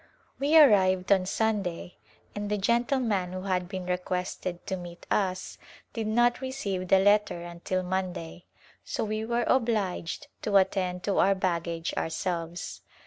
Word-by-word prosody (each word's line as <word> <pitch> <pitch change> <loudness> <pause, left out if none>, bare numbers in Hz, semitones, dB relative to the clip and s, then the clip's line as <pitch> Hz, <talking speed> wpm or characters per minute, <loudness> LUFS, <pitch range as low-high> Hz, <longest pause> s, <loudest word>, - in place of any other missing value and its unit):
We 295 +4 +4
arrived 190 -9 +5
on 190 -2 +4
Sunday 195 -5 -1 0.4
and 205 0 -4
the 210 - 0
gentleman 235 -4 +1
who 185 0 -5
had 180 -2 -1
been 185 -2 -5
requested 180 0 -3
to 190 - -2
meet 175 -1 -9
us 185 -2 -1 0.3
did 225 -2 -3
not 240 +3 +2
receive 205 -9 -3
the 195 - +6
letter 205 -3 +3
until 175 +2 -3
Monday, 180 -2 -4 0.4
so - - -3
we 215 0 -2
were 235 +1 0
obliged 220 - 0 0.2
to 205 -2 +3
attend 185 -2 +1
to 200 - +1
our 195 0 +4
baggage 170 -3 -2
ourselves. 170 +1 -3
190 Hz, 140 wpm, -28 LUFS, 180-215 Hz, 0.4 s, the